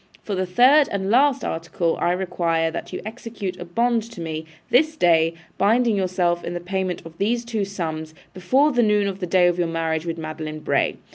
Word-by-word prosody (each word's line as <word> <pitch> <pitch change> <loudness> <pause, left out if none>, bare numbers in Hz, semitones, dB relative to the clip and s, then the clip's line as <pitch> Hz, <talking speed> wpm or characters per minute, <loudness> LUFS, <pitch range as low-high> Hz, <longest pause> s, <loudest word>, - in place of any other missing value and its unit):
For 205 - -4
the 185 -1 -1
third 260 +10 +5
and 195 0 -1
last 270 +2 +3
article, 165 +1 -1
I 175 - +2
require 170 -3 0
that - - -6
you - - -6
execute 220 -4 -6
a 175 - -6
bond 235 +6 +1
to 205 - -10
me, 160 -1 -4 0.3
this 310 +5 +3
day, 165 - +3 0.2
binding 230 +1 +3
yourself 180 -2 0
in 175 - -4
the - - -2
payment 185 0 -3
of 165 0 -11
these 235 +4 0
two 225 -4 -2
sums, 160 -5 -5 0.2
before 260 +12 +2
noon 210 -4 +3
of 195 -1 -4
the 180 - -3
day 180 0 +4
of 175 0 +2
your 175 - +1
marriage 165 0 -2
with 165 0 -3
Madeline 155 -1 -6
Bray. - - +1
185 Hz, 200 wpm, -22 LUFS, 165-225 Hz, 0.3 s, third